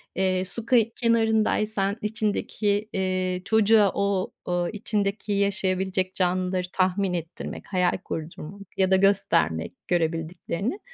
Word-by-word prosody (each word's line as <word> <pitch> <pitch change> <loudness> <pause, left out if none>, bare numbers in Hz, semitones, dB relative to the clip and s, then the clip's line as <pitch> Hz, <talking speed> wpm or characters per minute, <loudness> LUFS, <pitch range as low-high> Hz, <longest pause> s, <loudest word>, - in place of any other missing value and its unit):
Eee, 185 0 +1
su 220 +4 -6
kı 250 +1 +4 0.2
kenarındaysan 220 -3 +2
içindeki, 210 -1 -1
eee, 185 -1 -1
çocuğa 220 -2 +4
o 200 -1 0
o 175 -1 0
içindeki 205 0 -2
yaşayabilecek 190 -2 0
canlıları 185 0 0
tahmin 185 0 +1
ettirmek, 165 -1 -5
hayal 180 -2 +1
kurdurmak 160 +4 -7 0.2
ya 190 -1 +2
da 190 - +7
göstermek 190 - +2
görebildiklerini. 170 - -1
190 Hz, 110 wpm, -25 LUFS, 180-205 Hz, 0.2 s, da